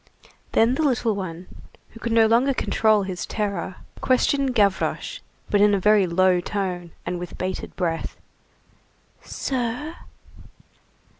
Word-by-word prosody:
Then 230 +2 +4
the 275 - -1
little 245 -6 +1
one, 180 -2 -6 0.4
who 225 - -14
could 235 - -3
no 225 -1 +5
longer 245 +5 +3
control 215 -4 +2
his 185 -2 -4
terror, 200 -4 -3 0.2
questioned 265 0 +1
Gavroche, 205 - +1 0.3
but 205 - +3
in 205 0 +5
a - - 0
very 210 0 +4
low 180 +1 +3
tone, 180 -2 -3 0.2
and 175 0 -3
with 180 - -7
bated 185 0 -4
breath:— 165 -3 -2 1.0
"Sir?" 260 +5 -3
210 Hz, 130 wpm, -23 LUFS, 185-240 Hz, 1.0 s, no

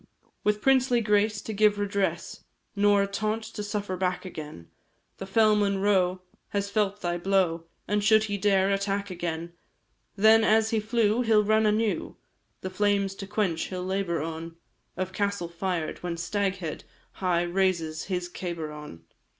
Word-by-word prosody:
With 210 0 0
princely 260 -2 +4
grace 210 -1 +1
to 220 - -5
give 210 0 +3
redress, 200 -1 -2 0.3
Nor 205 0 +4
a - - -1
taunt 215 +2 -2
to 220 -1 -7
suffer 205 -2 -3
back 185 0 -2
again; 150 - -8 0.5
The 195 - -7
fell 215 +2 +4
Monro 195 -3 +1 0.2
has 200 0 -3
felt 205 -1 0
thy 175 0 -1
blow, 175 -3 +1 0.2
And 210 0 0
should 215 0 +5
he 205 -2 -2
dare 195 -1 +3
attack 200 0 -1
again, 170 -1 -4 0.6
Then 220 +2 +6
as 220 0 +3
he 225 - +2
flew, 220 +1 +1
he 230 -2 -1
'll 210 -1 +6
run 215 +1 +3
anew, 215 0 0 0.5
The 185 - -5
flames 200 0 +1
to 195 0 -8
quench 195 -6 -1
he 185 - -6
'll 180 0 -4
labour 185 -4 -1
on, 165 +1 -6 0.4
Of 185 0 -3
castle 200 -3 -1
fired 170 -2 -3
when 175 -1 -3
Staghead 190 -2 -2 0.3
High 180 -2 0
raises 175 -3 0
his 180 -2 -2
cabar 170 -3 -5
on! 150 - -10
195 Hz, 160 wpm, -27 LUFS, 180-210 Hz, 0.6 s, Then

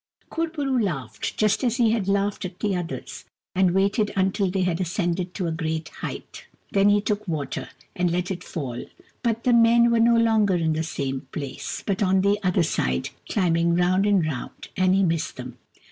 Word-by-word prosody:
Kur 330 +1 0
bo 305 -3 -4
roo 265 -2 +1
laughed, 130 - -4
just 215 +4 +2
as 240 -1 +1
he 230 -3 +4
had 220 -4 0
laughed 200 +1 0
at 185 -1 -7
the 205 -2 0
others, 175 -2 -5 0.3
and 185 0 +3
waited 200 +2 +2
until 195 +1 +1
they 185 0 0
had 180 0 0
ascended 175 0 -2
to 185 - -2
a 165 - -1
great 160 -1 -3
height. - - -8 0.2
Then 200 0 +4
he 205 0 +4
took 210 0 -2
water, 155 -5 -3 0.3
and 180 -1 +1
let 180 +2 -1
it 180 -1 -5
fall 130 -7 -5 0.2
— - - -34
but 230 -1 -1
the 250 - +3
men 235 0 +5
were 235 - +3
no 235 +1 +5
longer 220 -4 +3
in 165 -2 +1
the 155 - -1
same 135 -4 -3
place, 140 -3 -5
but 195 -1 -1
on 190 -1 +3
the 200 +1 +2
other 180 -2 +2
side, 65 - -1 0.2
climbing 170 -3 +2
round 185 +3 +2
and 195 -5 +3
round, 145 -6 -6
and 185 0 +3
he 195 - +3
missed 165 -3 0
them. 125 -1 -8
185 Hz, 205 wpm, -24 LUFS, 165-205 Hz, 0.3 s, men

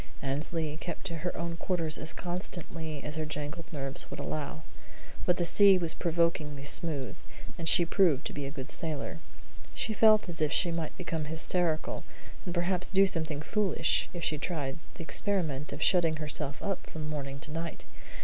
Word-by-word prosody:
Annesley 150 +3 -1
kept 170 +2 -6
to 170 -3 -3
her 175 +3 -3
own 170 0 -3
quarters 165 -4 -1
as 155 - -4
constantly 165 -4 -4
as 150 - -4
her 155 - 0
jangled 155 +2 -5
nerves 135 -3 0
would - - -7
allow; 155 +1 -4 0.6
but 180 - +4
the 175 - +1
sea 195 +2 +7
was 170 -3 0
provokingly 165 -4 0
smooth, 145 -2 0 0.4
and 165 -1 +1
she 175 - +7
proved 165 -5 +3
to - - -3
be 145 -1 -4
a - - -3
good 140 0 -6
sailor. 160 0 -3 0.6
She 220 - -1
felt 215 0 +6
as 170 -2 -1
if 150 -2 +2
she 175 - +3
might 165 -2 -3
become 165 -3 -3
hysterical, 160 +1 +2 0.4
and - - -1
perhaps 180 +1 +1
do 195 0 +5
something 160 -5 0
foolish, 210 0 +2
if 175 -2 -6
she 150 -2 0
tried 150 -3 -2 0.2
the - - -6
experiment 160 -6 -1
of 145 +1 -2
shutting 170 -4 +4
herself 150 -2 -1
up 195 -3 -2
from 155 -1 -6
morning 140 -2 -4
to 150 - -3
night. 165 +1 -4
160 Hz, 180 wpm, -30 LUFS, 150-175 Hz, 0.6 s, sea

